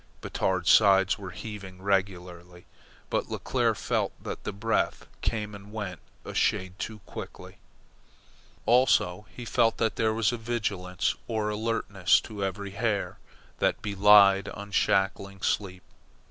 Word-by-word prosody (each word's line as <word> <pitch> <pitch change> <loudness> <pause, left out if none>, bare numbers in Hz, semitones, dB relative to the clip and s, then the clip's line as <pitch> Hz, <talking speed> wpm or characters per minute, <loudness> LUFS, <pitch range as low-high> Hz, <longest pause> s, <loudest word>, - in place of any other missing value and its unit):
Batard's 90 -3 0
sides 95 -1 +5
were 95 -2 -7
heaving 95 0 -8
regularly, 90 -3 -2 0.5
but - - -1
Leclere - - 0
felt - - -1
that - - -6
the - - -2
breath 110 +3 -1 0.2
came 105 -2 -2
and 100 0 -11
went 105 -5 -5 0.3
a - - -6
shade 95 +1 0
too 110 -2 -5
quickly; - - -9 1.1
also 110 -5 +3
he 120 - -9
felt 115 0 +2
that 110 -3 0
there 110 -1 +2
was 115 0 +2
a 120 - -3
vigilance 105 -6 -2
or 110 -2 -1
alertness 105 -5 +1
to 105 -2 -6
every 100 +1 -3
hair 105 0 -2 0.4
that - - +1
belied 100 -1 +6
unshackling 100 -1 0
sleep. 90 -3 -1
100 Hz, 130 wpm, -27 LUFS, 95-110 Hz, 1.1 s, belied